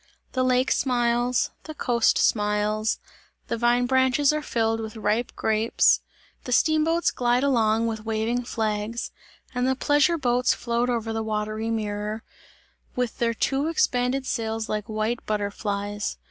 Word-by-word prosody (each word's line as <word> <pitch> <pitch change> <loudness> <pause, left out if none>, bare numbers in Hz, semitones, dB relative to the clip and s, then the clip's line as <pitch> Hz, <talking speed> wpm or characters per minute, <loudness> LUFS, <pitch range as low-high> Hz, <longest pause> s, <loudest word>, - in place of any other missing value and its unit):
The 255 - -1
lake 255 0 +2
smiles, 240 -1 +1
the 310 - -7
coast 235 -4 +2
smiles; 210 0 +1 0.5
the - - 0
vine 240 +1 +2
branches 260 +3 +3
are 305 - -1
filled 225 -5 0
with 220 0 -6
ripe 215 +3 0
grapes; 220 +1 +3 0.5
the 250 - -5
steamboats 315 +5 +3
glide 245 +1 +1
along 230 -4 +2
with 220 -1 -3
waving 225 +2 -1
flags 220 0 -2 0.4
and 250 0 0
the 265 - +2
pleasure 290 +5 +3
boats 250 -3 +2
float 235 +1 -1
over 225 -2 -1
the 225 - -2
watery 215 +1 -2
mirror, 215 0 -3 0.7
with 250 -2 -2
their 230 -1 +1
two 275 +5 0
expanded 260 -4 +1
sails 225 -3 -2
like 210 -1 -2
white 215 +2 -2
butterflies. 205 0 -2
235 Hz, 140 wpm, -25 LUFS, 215-250 Hz, 0.7 s, branches